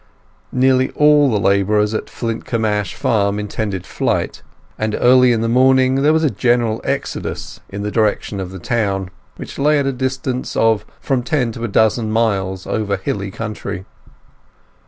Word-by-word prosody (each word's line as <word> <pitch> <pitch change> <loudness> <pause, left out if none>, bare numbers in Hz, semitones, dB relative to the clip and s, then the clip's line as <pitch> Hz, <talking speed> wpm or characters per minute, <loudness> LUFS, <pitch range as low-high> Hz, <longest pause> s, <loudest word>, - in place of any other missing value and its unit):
Nearly 130 0 +3
all 150 -1 +5
the 110 -4 +1
labourers 105 +2 +2
on 110 - -2
Flintcomb 115 -1 -3
Ash 105 -3 -1
farm 100 -2 +1
intended 105 -3 -3
flight, 90 - -2 0.3
and 110 0 -2
early 125 0 +5
in 115 -2 +1
the 115 - 0
morning 130 +2 +4
there 150 +2 +4
was 160 0 +2
a 150 - +2
general 120 -3 +1
exodus - - -4
in 100 +1 -5
the 105 - -2
direction 105 -2 0
of 95 -2 -4
the 95 - -8
town, 95 -2 -1 0.2
which - - -9
lay 150 +2 +3
at 140 - +1
a 135 - 0
distance 130 0 -3
of 110 -2 +2
from 135 -3 0
ten 125 -2 0
to 115 - -7
a - - 0
dozen 110 +1 +2
miles 95 -4 0
over 100 -2 -1
hilly 100 +1 -3
country. 105 -3 -6
110 Hz, 165 wpm, -18 LUFS, 100-130 Hz, 0.3 s, all